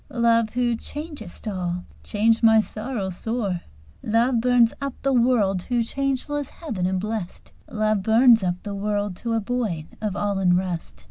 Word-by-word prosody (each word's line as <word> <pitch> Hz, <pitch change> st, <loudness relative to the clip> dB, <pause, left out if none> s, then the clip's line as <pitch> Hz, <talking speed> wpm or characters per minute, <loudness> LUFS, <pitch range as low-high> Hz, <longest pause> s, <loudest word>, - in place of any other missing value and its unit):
"Love, 230 Hz, -2 st, +2 dB
who 240 Hz, -1 st, +2 dB
changest 285 Hz, -, -8 dB
all, 180 Hz, -3 st, -3 dB, 0.2 s
change 225 Hz, +2 st, +2 dB
my 225 Hz, -1 st, +6 dB
sorrow 215 Hz, -2 st, -3 dB
sore!" 200 Hz, -1 st, -2 dB, 0.4 s
Love 230 Hz, +2 st, +2 dB
burns 245 Hz, -1 st, +4 dB
up 275 Hz, -2 st, -3 dB
the 275 Hz, 0 st, +2 dB
world 235 Hz, -6 st, +3 dB
to 240 Hz, +5 st, 0 dB
changeless 275 Hz, +3 st, -2 dB
heaven 220 Hz, -, -3 dB
and 185 Hz, 0 st, 0 dB
blest, 210 Hz, -2 st, -5 dB, 0.2 s
"Love 215 Hz, -2 st, +1 dB
burns 225 Hz, +1 st, +5 dB
up 175 Hz, -1 st, +1 dB
the 205 Hz, -, -5 dB
world 205 Hz, -1 st, -2 dB
to 230 Hz, +5 st, -3 dB
a 225 Hz, -, +2 dB
void 210 Hz, -8 st, -2 dB, 0.2 s
of 210 Hz, -3 st, -2 dB
all 205 Hz, -1 st, -1 dB
unrest." 180 Hz, -2 st, 0 dB
220 Hz, 155 wpm, -24 LUFS, 195-245 Hz, 0.4 s, my